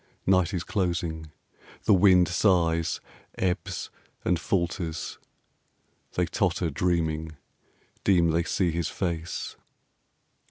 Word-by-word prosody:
Night 95 -1 +3
is 90 -4 -2
closing. 85 -5 -2 0.5
The - - +5
wind 90 -2 +6
sighs, 85 -3 +2 0.4
ebbs, 90 -2 -2 0.3
and 90 -2 +2
falters.... 85 -1 -2 0.9
They 90 - +1
totter 90 -2 0
dreaming, 80 -1 -1 0.7
deem 85 -4 +4
they 85 +1 +2
see 90 +1 0
his 85 -1 -1
face. 85 -3 -3
85 Hz, 95 wpm, -27 LUFS, 80-90 Hz, 0.9 s, wind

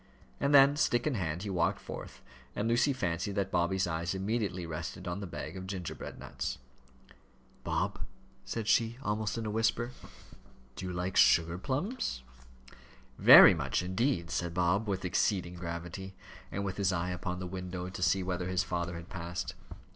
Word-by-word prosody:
And 140 - +1
then, 140 0 +7
stick 120 -5 +2
in 155 - +1
hand, 85 -5 -2
he 100 - -3
walked 85 -3 +1
forth, - - -9 0.3
and 105 - -1
Lucy 120 +5 +3
fancied 95 -5 -2
that 100 -1 -1
Bobby's 90 +2 +1
eyes 85 +1 -2
immediately 95 -3 -2
rested 80 +1 -6
on 90 +2 -3
the 100 - -5
bag 90 - -6
of 95 0 -7
gingerbread 95 -3 -6
nuts. - - -5 1.1
"Bob," - - -1 0.4
said 115 -2 -4
she, 115 +1 +2
almost 105 -1 -1
in 115 - -3
a 105 - -2
whisper, 115 +2 0 0.8
"do 95 - -5
you - - -3
like 90 +1 -2
sugar 85 +2 +5
plums?" 140 - -2 1.0
"Very - - +10
much - - -1
indeed," 95 -1 0
said 85 0 -2
Bob, 90 +5 +2
with 95 -2 -2
exceeding 90 0 0
gravity, 85 +2 -6 0.4
and 100 +1 -3
with 95 - -4
his 100 -2 +2
eye 90 0 -1
upon 90 0 -3
the 90 - -5
window 90 0 -5
to 90 0 -7
see 95 +1 +2
whether 90 -1 -2
his 90 0 +1
father 85 -1 -3
had 85 +1 -8
passed. 85 -1 -5
95 Hz, 170 wpm, -31 LUFS, 85-105 Hz, 1.1 s, Very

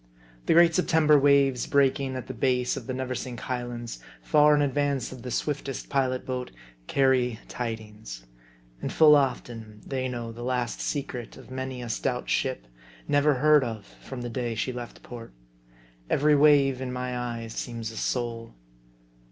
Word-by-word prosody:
The - - +5
great 170 0 +6
September 160 -4 +4
waves 140 -3 +3
breaking 135 -1 +2
at 130 - -5
the 130 - -6
base 125 +1 +1
of - - -7
the 130 - -2
Neversink 130 -2 -4
Highlands, 120 -2 -5 0.2
far 150 -1 +5
in 145 - +3
advance 140 -2 0
of 130 -2 -9
the 125 - -6
swiftest 140 +1 -3
pilot 130 -2 0
boat, 125 -1 -3 0.4
carry 130 -4 +2
tidings. 105 - -6 0.6
And - - -3
full 155 -2 +7
often, 115 -6 -2
they 130 -1 -2
know 120 -2 -5
the 115 +1 -10
last 125 -1 -2
secret 135 -5 -4
of - - -14
many 130 -1 -5
a - - -6
stout 125 +3 -2
ship, 130 - -1 0.4
never 145 0 +3
heard 150 +2 +5
of 110 -4 -5
from 130 +4 -10
the 120 - -4
day 120 -1 -2
she 125 +4 -2
left 120 -1 -8
port. 115 - -10 0.8
Every 150 +1 +4
wave 140 -3 +4
in 130 -1 -3
my 125 0 -3
eyes 115 -2 -4
seems 115 -1 -5
a 110 - -10
soul. 115 -2 -3
130 Hz, 160 wpm, -27 LUFS, 120-140 Hz, 0.8 s, full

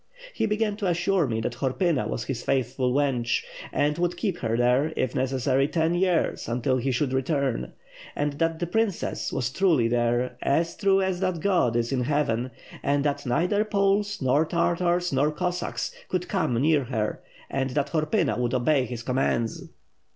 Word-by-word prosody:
He 225 - 0
began 210 -1 0
to 205 -3 -1
assure 175 -1 +1
me 115 -2 -1
that 115 - -2
Horpyna 145 +3 0
was 115 - -3
his 130 0 -4
faithful 130 -1 0
wench, 130 -4 +1 0.3
and 150 +3 0
would 175 0 0
keep 180 -1 -2
her 115 -1 -1
there, 125 +5 +2
if 130 -1 0
necessary, 130 0 +1
ten 160 +1 +1
years 175 -1 +1
until 125 +2 +1
he 130 +2 -1
should 130 +1 0
return; 135 -2 -1 0.4
and 145 0 -1
that 165 -1 +1
the 175 - -2
princess 215 +1 -1
was 125 -2 -1
truly 160 -8 +3
there, 120 +1 0
as 165 +4 +1
true 195 -1 +3
as 190 -1 -1
that 185 -3 -1
God 175 -10 +2
is 120 +1 0
in 125 -2 0
heaven, 130 -4 0 0.3
and 140 0 +1
that 145 -1 -1
neither 180 +12 +2
Poles, 205 -2 +1
nor 130 +4 +3
Tartars, 175 +1 0
nor 145 +3 +2
Cossacks 180 +3 -2 0.2
could 180 -1 -1
come 125 - 0
near 150 0 +3
her 110 -4 -2 0.3
and 135 0 -1
that 140 +2 -1
Horpyna 155 -8 +1
would 125 +1 0
obey 130 +1 +2
his 120 -1 -6
com 125 +1 -2
mands." 115 -3 -1
145 Hz, 175 wpm, -26 LUFS, 125-175 Hz, 0.4 s, truly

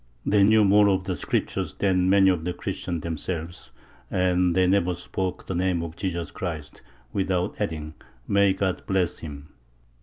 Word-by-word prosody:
They 105 -1 +3
knew 110 +1 +5
more 100 +1 +5
of 95 -1 +1
the 95 -1 -2
Scriptures 75 - -2
than 95 -2 +2
many 95 -1 +6
of 85 -3 -2
the 90 +1 -2
Christians 85 -1 -4
themselves, 85 +1 -5 0.4
and 90 -1 +2
they 95 0 +4
never 90 -1 +2
spoke 90 +1 -4
the - - -4
name 90 -1 0
of 80 -1 -7
Jesus 85 -3 -3
Christ 80 -5 -6 0.3
without 95 -2 0
adding, 75 -1 -3 0.3
"May 100 -1 +4
God 95 -1 -1
bless 95 -3 0
him." 75 -1 -9
90 Hz, 160 wpm, -25 LUFS, 85-95 Hz, 0.4 s, many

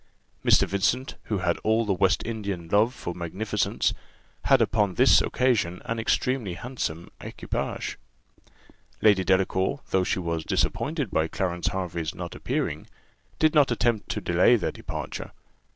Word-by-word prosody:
Mr. - - +5
Vincent, 115 +7 0
who 105 - -1
had 90 -2 0
all 110 +1 +1
the 100 - +1
West 95 0 +2
Indian 100 -7 -4
love 105 +5 +4
for 90 -8 -6
magnificence, 90 +5 -1 0.5
had - - +5
upon 105 -4 +1
this 130 +2 +6
occasion 110 -9 +1
an 115 0 -2
extremely 115 -3 0
handsome 90 -9 -5
equipage. - - -4 1.0
Lady 100 -3 +5
Delacour, 95 +7 +1
though 95 - +3
she - - 0
was 85 -3 -2
disappointed 145 - -1
by 80 - +1
Clarence 90 0 -2
Hervey's 90 -4 -3
not - - -6
appearing, - - -3 0.5
did 155 -1 +3
not 145 -3 +5
attempt 120 -2 0
to - - -2
delay 90 +8 +4
their 105 - -1
departure. - - -6
100 Hz, 140 wpm, -26 LUFS, 90-115 Hz, 1.0 s, this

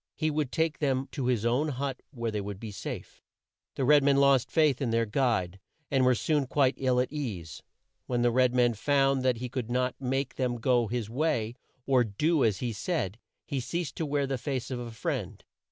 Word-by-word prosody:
He 155 -1 0
would 150 -3 -1
take 160 -1 0
them 135 -2 0
to 135 -4 -3
his 120 -3 +1
own 125 +6 +2
hut 135 -1 -3
where 115 -5 -3
they 105 -1 -2
would 100 -1 -6
be 110 -1 -6
safe. 100 - -7 0.5
The 135 - 0
white 145 +2 +6
men 140 0 +3
lost 140 -3 +4
faith 150 -5 +3
in 130 - 0
their 115 0 +2
guide, 105 -6 0 0.3
and 135 -2 +3
were 125 0 +4
soon 145 +2 0
quite 135 -1 +3
ill 130 -2 +2
at 125 - 0
ease. 105 - -5 0.5
When 120 -1 0
the 120 - +4
red 125 +1 +3
man 120 -1 +4
found 135 +3 +2
that 130 -2 +2
he 125 +2 -4
could 125 -2 -4
not 125 +1 0
make 135 +1 -2
them 125 -2 0
go 120 -1 +2
his 115 -1 -2
way, 120 -3 0 0.3
or 130 -2 +4
do 150 +9 +1
as 105 -4 +1
he 120 - -2
said, 110 - -2 0.3
he 140 -3 -2
ceased 165 +4 -3
to 160 - -2
wear 140 -1 0
the 135 -2 -2
face 130 0 -3
of 125 - -3
a 120 -1 -6
friend. 110 -1 -4
130 Hz, 215 wpm, -29 LUFS, 115-140 Hz, 0.5 s, white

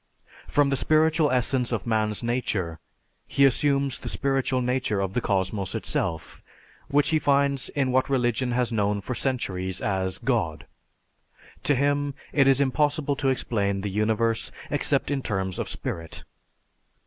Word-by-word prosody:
From 145 -1 +2
the - - +2
"spiritual 155 +1 +3
essence 125 0 0
of 115 -5 -2
Man's 110 -1 0
nature," 110 -9 -2 0.5
he 140 - +3
assumes 140 0 +2
the - - -4
spiritual 135 -2 0
nature 125 -4 0
of 95 -1 -2
the 125 - 0
cosmos 95 -1 -1
itself, 80 -1 -2 0.5
which 145 0 +3
he 160 -1 +2
finds 140 -2 +2
in 135 -3 0
what 130 +1 +1
religion 125 -1 +1
has 120 -1 0
known 105 -2 0
for 105 +6 -5
centuries 95 -9 -2
as 95 -2 -1
God. 95 - -1 1.0
To 145 - +3
him, 145 +1 0 0.2
it 140 -2 +4
is 135 0 +5
impossible 145 +1 +1
to 140 - -1
explain 100 -6 0
the 100 0 -3
universe 110 +2 0 0.2
except - - +1
in 140 -1 -1
terms 95 -5 -2
of - - -2
spirit. 80 -1 -5
125 Hz, 150 wpm, -25 LUFS, 100-140 Hz, 1.0 s, is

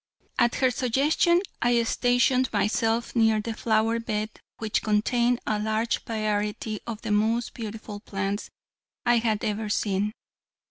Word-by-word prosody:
At 240 0 +3
her 260 -1 +3
suggestion 280 +8 +2 0.2
I 240 -1 +3
stationed 245 +2 +2
myself 225 +3 0
near 220 -2 +4
the 225 +2 -3
flower 225 0 +1
bed 215 -1 -2 0.3
which 220 -1 -1
contained 235 +3 +2
a 215 -1 0
large 220 +2 0
variety 215 -1 -2
of 225 -1 -5
the 220 - -2
most 225 +3 +1
beautiful 215 -2 -7
plants 200 0 -3 0.6
I 240 -1 +4
had 220 -2 0
ever 215 0 -2
seen. 205 0 0
225 Hz, 135 wpm, -26 LUFS, 210-235 Hz, 0.6 s, near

